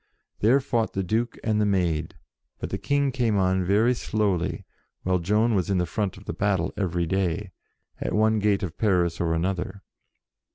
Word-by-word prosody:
There 120 Hz, +6 st, +4 dB
fought 120 Hz, -5 st, -1 dB
the 95 Hz, -, -1 dB
Duke 115 Hz, +6 st, -1 dB
and 110 Hz, -1 st, +1 dB
the -, -, +3 dB
Maid, 85 Hz, -5 st, 0 dB, 0.4 s
but -, -, -5 dB
the -, -, -2 dB
King 140 Hz, -1 st, +1 dB
came 120 Hz, -5 st, +1 dB
on 95 Hz, -1 st, +2 dB
very 105 Hz, +7 st, +3 dB
slowly, 105 Hz, -7 st, -1 dB, 0.4 s
while 90 Hz, 0 st, +1 dB
Joan 105 Hz, +6 st, +2 dB
was 95 Hz, -3 st, 0 dB
in 100 Hz, -, +2 dB
the 90 Hz, -, +1 dB
front 100 Hz, 0 st, -2 dB
of 95 Hz, -, -14 dB
battle 100 Hz, -4 st, +1 dB
every 85 Hz, -3 st, -1 dB
day, 95 Hz, +2 st, -1 dB, 0.5 s
at -, -, -2 dB
one 110 Hz, +1 st, +3 dB
gate 105 Hz, -1 st, +1 dB
of 85 Hz, -3 st, -5 dB
Paris 90 Hz, -6 st, +2 dB
or 80 Hz, -1 st, +1 dB
another. 95 Hz, +3 st, -2 dB
100 Hz, 175 wpm, -25 LUFS, 90-110 Hz, 0.5 s, There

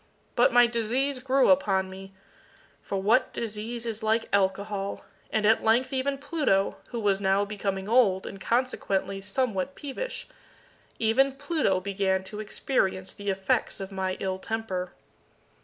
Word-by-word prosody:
But 240 Hz, -, +5 dB
my 245 Hz, 0 st, +7 dB
disease 240 Hz, +4 st, 0 dB
grew 265 Hz, +1 st, +3 dB
upon 195 Hz, -9 st, +2 dB
me 195 Hz, +1 st, -10 dB, 0.7 s
for 195 Hz, -, -3 dB
what 220 Hz, +7 st, +3 dB
disease 230 Hz, +1 st, -4 dB
is 225 Hz, -1 st, -4 dB
like 220 Hz, +1 st, +1 dB
Alcohol! 200 Hz, +1 st, 0 dB, 0.2 s
and 215 Hz, -1 st, 0 dB
at 220 Hz, +1 st, +4 dB
length 245 Hz, +4 st, +2 dB
even 275 Hz, +1 st, 0 dB
Pluto, 285 Hz, -, 0 dB
who 240 Hz, -, -5 dB
was 200 Hz, -3 st, +2 dB
now 195 Hz, +1 st, +2 dB
becoming 195 Hz, -2 st, -3 dB
old, 215 Hz, -5 st, +3 dB
and 195 Hz, -, -8 dB
consequently 200 Hz, -5 st, 0 dB
somewhat 205 Hz, +3 st, -1 dB
peevish 300 Hz, -, -5 dB, 0.7 s
even 260 Hz, +5 st, +3 dB
Pluto 285 Hz, -, 0 dB
began 190 Hz, 0 st, 0 dB
to 210 Hz, +2 st, -8 dB
experience 195 Hz, -3 st, -1 dB
the 205 Hz, 0 st, -5 dB
effects 190 Hz, +1 st, 0 dB
of 195 Hz, 0 st, -6 dB
my 190 Hz, -1 st, -2 dB
ill 190 Hz, -1 st, -2 dB
temper. 190 Hz, -5 st, -3 dB
215 Hz, 140 wpm, -27 LUFS, 195-250 Hz, 0.7 s, my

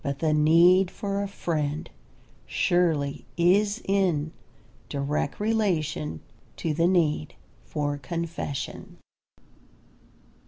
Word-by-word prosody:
But 140 Hz, -2 st, -2 dB
the 155 Hz, +1 st, +1 dB
need 170 Hz, +5 st, +5 dB
for 200 Hz, 0 st, -3 dB
a 200 Hz, -, -2 dB
friend 155 Hz, -6 st, -2 dB, 0.6 s
surely 160 Hz, -6 st, +1 dB
is 200 Hz, +6 st, +3 dB
in 180 Hz, -6 st, +1 dB, 0.6 s
direct 140 Hz, 0 st, -2 dB
relation 170 Hz, -, 0 dB, 0.4 s
to 160 Hz, -, -1 dB
the 165 Hz, +3 st, +2 dB
need 160 Hz, -, +1 dB, 0.3 s
for 145 Hz, -1 st, -2 dB
confession. 165 Hz, -1 st, -5 dB
165 Hz, 90 wpm, -26 LUFS, 145-185 Hz, 0.6 s, need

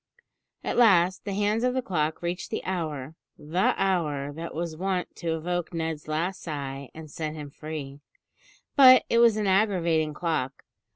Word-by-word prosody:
At -, -, -2 dB
last, 185 Hz, -5 st, +4 dB
the 200 Hz, -, -3 dB
hands 210 Hz, +3 st, +1 dB
of 250 Hz, 0 st, +1 dB
the 260 Hz, -, 0 dB
clock 160 Hz, -5 st, -1 dB
reached 175 Hz, +1 st, -3 dB
the -, -, -3 dB
hour, 155 Hz, -6 st, -3 dB, 0.2 s
the 160 Hz, +5 st, +1 dB
hour 150 Hz, -7 st, 0 dB
that 165 Hz, +3 st, -7 dB
was 165 Hz, -1 st, -3 dB
wont 185 Hz, +1 st, -2 dB
to 165 Hz, -1 st, -2 dB
evoke 175 Hz, +1 st, -3 dB
Ned's 160 Hz, -2 st, -3 dB
last 165 Hz, +5 st, -2 dB
sigh 140 Hz, -4 st, -5 dB
and 160 Hz, 0 st, -9 dB
set 155 Hz, 0 st, -4 dB
him 145 Hz, -2 st, -8 dB
free; 145 Hz, -2 st, -7 dB, 0.8 s
but 255 Hz, -3 st, +9 dB
it 235 Hz, -, +4 dB
was 230 Hz, -2 st, +5 dB
an 210 Hz, -, 0 dB
aggravating 175 Hz, -6 st, +2 dB
clock. 150 Hz, -6 st, -2 dB
165 Hz, 165 wpm, -26 LUFS, 155-190 Hz, 0.8 s, but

